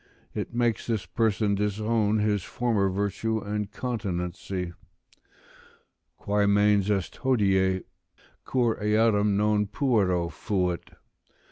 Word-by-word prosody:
It - - -4
makes 120 -1 0
this 110 -4 -1
person 110 -3 +1
disown 105 +1 +1
his 105 -1 +1
former 110 -2 0
virtue 100 +3 -1
and 105 -1 -3
continency: 90 -6 -4 1.4
"Quae 100 0 +1
mens 105 0 +3
est 100 -3 -1
hodie, 95 -7 +2 0.6
cur 120 -3 +1
eadem 105 -1 +3
non 105 0 +2
puero 100 -9 +1
fait? 90 -5 -2
105 Hz, 100 wpm, -27 LUFS, 95-110 Hz, 1.4 s, mens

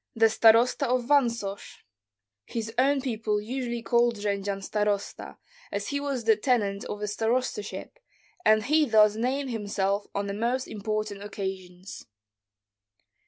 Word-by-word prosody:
"The 225 0 +5
starosta 230 +5 +4
of 250 0 +1
Vansosh." 235 -8 0 0.6
His 225 -1 -5
own 275 +1 +3
people 220 -5 -1
usually 240 +1 -4
called 235 0 +2
Jendzian 200 -1 -2
starosta, 205 0 -2 0.3
as - - -3
he 285 - -1
was 280 -4 -3
the 220 0 +5
tenant 210 -4 0
of 210 - -6
a - - -1
starostaship, 225 - -2 0.4
and 215 0 +4
he 305 +5 +3
thus 215 -4 +5
named 260 +4 -1
himself 205 -2 -1
on 200 0 -1
the 200 - -3
most 240 +5 -1
important 215 -1 -3
occasions. 190 -2 -7
220 Hz, 130 wpm, -27 LUFS, 205-245 Hz, 0.6 s, The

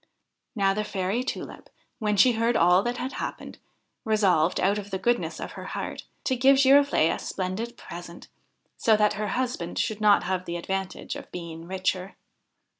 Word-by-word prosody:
Now 195 -2 +2
the 215 +2 -1
Fairy 200 +3 -2
Tulip, 260 - -6 0.3
when 210 -2 0
she 250 +6 +6
heard 230 +1 +1
all 180 +2 +5
that 240 +3 -2
had 255 +2 -3
happened, - - -6 0.4
resolved, 190 -7 +2
out 200 +3 +2
of 205 0 -8
the 190 - -2
goodness 240 +5 0
of - - -6
her - - -9
heart, - - -5 0.2
to 260 - +1
give 265 +2 +5
Giroflee 275 - +5
a - - -3
splendid 200 +6 -4
present, 175 0 -10 0.5
so 220 -2 +4
that 210 0 +3
her 210 0 -3
husband 240 -6 -2
should 215 -2 -1
not 210 -1 +5
have 185 0 -2
the 170 0 -3
advantage 190 +2 -4
of - - -10
being 170 -2 -7
the 165 - -12
richer. 185 +1 -2
205 Hz, 180 wpm, -26 LUFS, 185-235 Hz, 0.5 s, she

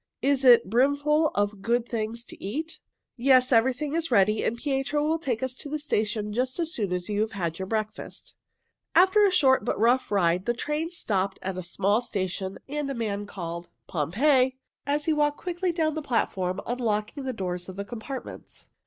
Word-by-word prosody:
"Is 275 -1 +2
it 240 -4 +7
brimful 285 +7 +3
of 205 0 0
good 235 +2 0
things 230 0 -3
to - - -12
eat?" 310 +11 -4 0.4
"Yes, 255 +1 +4
everything 260 +5 +2
is 330 0 0
ready, 215 -2 +3
and 235 - -1
Pietro 280 +2 -1
will 325 +1 +1
take 255 -6 -2
us 260 -1 -1
to 285 - -6
the 305 - -2
station 210 -7 -1
just 255 +3 -1
as 330 0 0
soon 205 -5 -1
as 180 -1 -2
you 210 0 0
have 220 +1 -1
had 170 -4 -3
your 190 - -4
breakfast." 215 0 -5 0.6
After 380 +4 +6
a 400 - +5
short 265 - +4
but - - -1
very 215 - 0
rough 250 +3 +3
ride 180 -1 +1
the 240 - +1
train 300 +6 -2
stopped 200 - -1
at 190 0 -3
a 185 - -4
small 195 +5 +1
station, 190 -4 -3
and 295 0 -3
a 275 - -3
man 205 -3 -3
called, 170 -3 -6 0.2
"Pompeii!" 255 - +2 0.3
as 290 +1 0
he 320 - +2
walked 295 -1 +1
quickly 355 0 -2
down 320 -2 0
the 315 - -3
platform 195 -8 -1
unlocking 235 +2 -2
the 260 - -1
doors 180 -5 -4
of 185 - -8
the 200 +1 -5
compartments. 245 +4 -8
240 Hz, 195 wpm, -26 LUFS, 200-285 Hz, 0.6 s, it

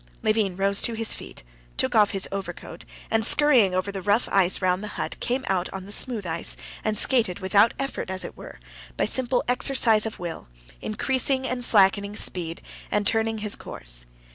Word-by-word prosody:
Levin 215 -4 +1
rose 195 +1 +2
to 235 - 0
his 225 0 +2
feet, - - -9 0.3
took 260 -1 0
off 210 -3 +4
his 195 -2 +1
overcoat, 175 -3 -7 0.3
and 225 0 +1
scurrying 240 -8 +4
over 185 +2 -2
the 195 -1 -6
rough 205 +5 +1
ice 190 -1 +3
round 185 +1 0
the - - -5
hut, - - -3
came 255 +2 -2
out 185 -2 -1
on 190 -1 -7
the 200 - -10
smooth 225 -2 +2
ice 165 0 +2 0.3
and 215 -1 -1
skated 225 -9 +1
without 200 +3 +2
effort, 275 -7 -4
as 190 0 -1
it - - -9
were, - - -12 0.4
by - - +1
simple 255 -1 +1
exercise 245 -3 +3
of 220 - -8
will, 170 - -7 0.3
increasing 260 +4 0
and 250 -1 -2
slackening 200 -1 +3
speed 170 -5 -1 0.3
and 210 0 -1
turning 225 0 +2
his 210 -1 -1
course. - - -7
210 Hz, 185 wpm, -24 LUFS, 190-235 Hz, 0.4 s, off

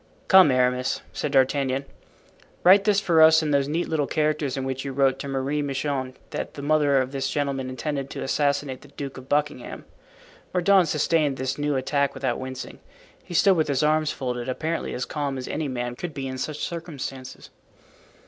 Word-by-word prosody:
"Come, 190 -5 +8
Aramis," 125 0 +1
said 150 - -3
D'Artagnan, 135 0 +2 0.8
"write 195 +2 +7
this 205 -2 +4
for 170 -5 +3
us 160 0 +7
in 150 - -1
those 140 -1 +2
neat 165 +4 -1
little 150 -3 0
characters 150 -3 0
in 135 - -2
which 130 0 -3
you 135 -1 -5
wrote 135 -1 +2
to - - -5
Marie 135 +2 -1
Michon 135 -2 -2 0.2
that - - -5
the 140 - -7
mother 145 -2 +3
of 130 0 -1
this 135 -1 -2
gentleman 135 -2 -2
intended 140 +1 -4
to - - -5
assassinate 140 -1 0
the 145 - -15
Duke 140 -1 -7
of 130 - -15
Buckingham." 150 0 -2 0.7
Mordaunt 185 0 +4
sustained 150 -2 +1
this 130 +2 -3
new 145 -1 0
attack 140 +1 0
without 130 -3 -2
wincing. 130 0 -7 0.4
He 175 - -8
stood 195 +2 +5
with 160 -2 +1
his 140 0 0
arms 155 0 +2
folded, 125 -1 -4
apparently 160 +6 -3
as 125 - -2
calm 145 -3 -3
as 130 - -6
any 155 -1 -2
man 120 -2 -3
could 160 +2 -6
be 135 -2 -4
in 130 0 -5
such 150 +3 -3
circumstances. 140 -6 -7
140 Hz, 185 wpm, -25 LUFS, 130-155 Hz, 0.8 s, Come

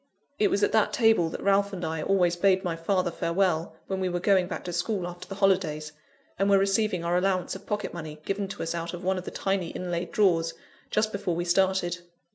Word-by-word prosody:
It 205 - +4
was 205 - +1
at - - +3
that 220 -1 +2
table 220 -8 +4
that - - -6
Ralph 200 0 +3
and 180 -3 -4
I 160 0 -2
always 180 -1 +2
bade 190 +1 +3
my 175 -2 -1
father 180 +1 0
farewell, 170 -1 0
when 190 -1 -3
we 185 -1 0
were 175 0 -1
going 190 -1 +3
back 185 - -5
to 175 - -5
school 180 +2 -1
after 175 0 -9
the 195 - -6
holidays, 180 -6 +1 0.5
and 195 +1 +2
were 200 - +6
receiving 195 -2 +1
our 175 +1 +2
allowance 185 -1 0
of - - -11
pocket 210 0 -2
money, 155 -3 -7
given 195 0 -2
to - - -5
us 165 - -2
out 170 +1 -4
of 175 - -9
one 190 0 +1
of 180 - -9
the - - -4
tiny 195 -3 -1
inlaid 175 -1 -4
drawers, 165 -5 +2 0.3
just 215 0 +1
before 195 -4 -2
we 175 +1 -2
started. 180 -1 +1
185 Hz, 230 wpm, -27 LUFS, 170-195 Hz, 0.5 s, were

